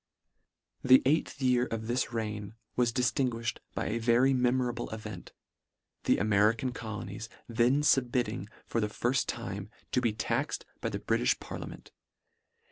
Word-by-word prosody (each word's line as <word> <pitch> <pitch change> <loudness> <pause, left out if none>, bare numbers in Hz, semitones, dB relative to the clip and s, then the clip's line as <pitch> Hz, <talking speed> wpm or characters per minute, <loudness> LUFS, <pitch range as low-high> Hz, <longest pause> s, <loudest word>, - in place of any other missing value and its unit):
" - - -58 0.3
The 130 0 +7
eighth 145 +1 +1
year 125 -1 +3
of 110 -1 -4
this 120 +2 0
reign 105 -2 -4 0.2
was 120 -1 +3
dif 125 0 +1
tinguifhed 120 -3 -1 0.2
by - - -1
a 115 +2 -1
very 120 +3 +4
memorable 125 -1 +1
event, 105 -4 -7 0.7
the - - +4
American 110 +4 +3
colonies 110 -2 -6 0.2
then 120 +5 +3
Submitting 120 -6 +2 0.2
for 115 - -1
the 105 - +1
firft 120 +5 0
time, 105 -4 -4 0.2
to 125 - +2
be 120 -3 +2
taxed 105 - -2
by - - -2
the - - -3
Britifh 60 - +1
parlia - - -7
ment. - - -11
120 Hz, 150 wpm, -30 LUFS, 110-125 Hz, 0.7 s, The